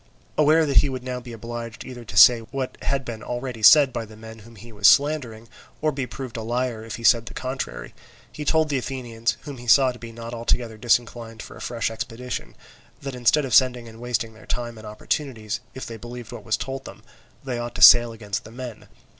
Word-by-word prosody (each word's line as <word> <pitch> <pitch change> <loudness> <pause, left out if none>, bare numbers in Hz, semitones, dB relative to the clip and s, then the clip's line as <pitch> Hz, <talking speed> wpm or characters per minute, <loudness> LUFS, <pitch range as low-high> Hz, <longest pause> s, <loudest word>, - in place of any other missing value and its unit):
Aware 155 +2 +4
that 140 -2 -1
he 145 - +6
would 130 -1 -5
now 125 -1 -4
be 125 -1 -11
obliged 115 0 -7
either 125 -2 -9
to 105 -3 -8
say 120 +3 +9
what 130 +3 -5
had 135 -1 -1
been 115 -2 -6
already 125 -2 -5
said 140 +3 +7
by 120 - -3
the 110 -1 -13
men 110 0 -11
whom 115 +2 -15
he 115 +3 -13
was 105 -2 +3
slandering, 130 -6 +3 0.3
or 155 0 +1
be 135 -3 -4
proved 130 -3 -7
a - - -4
liar 120 0 -2
if 115 0 -6
he 115 - -10
said 115 0 +4
the - - -9
contrary, 130 +1 -5 0.4
he 150 - -6
told 160 +1 +2
the 140 -3 0
Athenians, 115 -3 -3
whom 145 -2 -8
he 120 0 -11
saw 130 +2 +6
to 125 - -12
be 115 -1 -9
not 115 +1 -8
altogether 115 -1 -1
disinclined 115 -1 0
for - - -11
a - - -12
fresh 115 -2 -2
expedition, 120 +2 -6 0.4
that 135 -1 -6
instead 125 +4 +2
of 130 - -4
sending 125 -2 +4
and 115 0 -12
wasting 120 -2 -2
their 110 - -17
time 120 -2 -4
and 110 - -10
opportunities, 110 0 -3 0.2
if 130 - -6
they 115 - -7
believed 120 +1 -9
what 115 -3 -9
was 110 - 0
told 135 0 -5
them, 110 - -11 0.4
they 125 -3 -3
ought 120 0 -5
to - - -5
sail 120 -1 +9
against 105 -3 -5
the - - -12
men. 120 -1 -9
120 Hz, 225 wpm, -24 LUFS, 115-130 Hz, 0.4 s, say